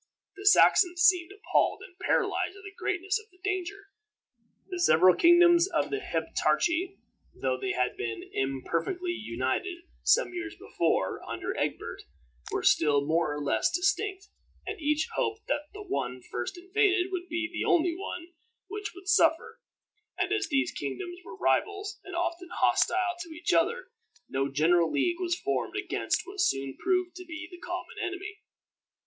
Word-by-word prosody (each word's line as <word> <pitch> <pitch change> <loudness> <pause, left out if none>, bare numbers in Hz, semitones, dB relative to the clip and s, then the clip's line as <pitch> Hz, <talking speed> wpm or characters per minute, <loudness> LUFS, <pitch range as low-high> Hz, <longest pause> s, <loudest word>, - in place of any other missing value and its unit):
The 400 +1 -5
Saxons 360 -3 +6
seemed 355 0 +4
appalled 415 +2 +1
and 365 - -13
paralyzed 390 - 0
at 390 - -14
the 410 +1 -9
greatness 380 +4 -1
of 435 +1 -17
the 365 - -25
danger. 395 0 -3 0.8
The 365 -2 -5
several 185 - +6
kingdoms 345 - +6
of 345 -4 -1
the 415 - -1
Heptarchy, 365 -2 0 0.4
though 130 -1 0
they 195 - -1
had 125 0 0
been 115 -1 -4
imperfectly 165 - -1
united, 335 - -3 0.2
some - - +3
years 345 -2 -5
before, 165 -1 0
under - - -4
Egbert, - - -3 0.5
were - - -1
still 145 -3 +4
more 160 0 +1
or 145 - -3
less 110 -6 +2
distinct, 390 +2 -1 0.4
and - - -5
each 300 +1 +1
hoped 430 0 -1
that 295 +1 -2
the 420 +1 -9
one 130 - -3
first 120 - -4
invaded 375 0 +1
would 360 -1 -4
be 345 +1 -1
the - - -2
only 345 -2 +3
one 350 -2 -6 0.4
which 415 -1 -5
would 375 0 -13
suffer; 330 -3 +3 0.6
and 380 +3 0
as 420 -4 0
these 290 +2 +1
kingdoms 355 -2 -5
were - - -10
rivals, 410 0 0
and 380 - -8
often 345 0 -2
hostile 360 0 +2
to 340 -1 -7
each 345 - -1
other, 475 +2 +1 0.4
no 135 +1 -1
general 165 +3 +3
league 350 0 +1
was 350 -1 0
formed - - -2
against - - -1
what 390 0 -4
soon 135 - 0
proved 365 -1 +1
to 365 - -8
be 320 -1 -7
the 355 - -11
common 350 +1 -6
enemy. 390 +4 -5
355 Hz, 160 wpm, -29 LUFS, 295-385 Hz, 0.8 s, Saxons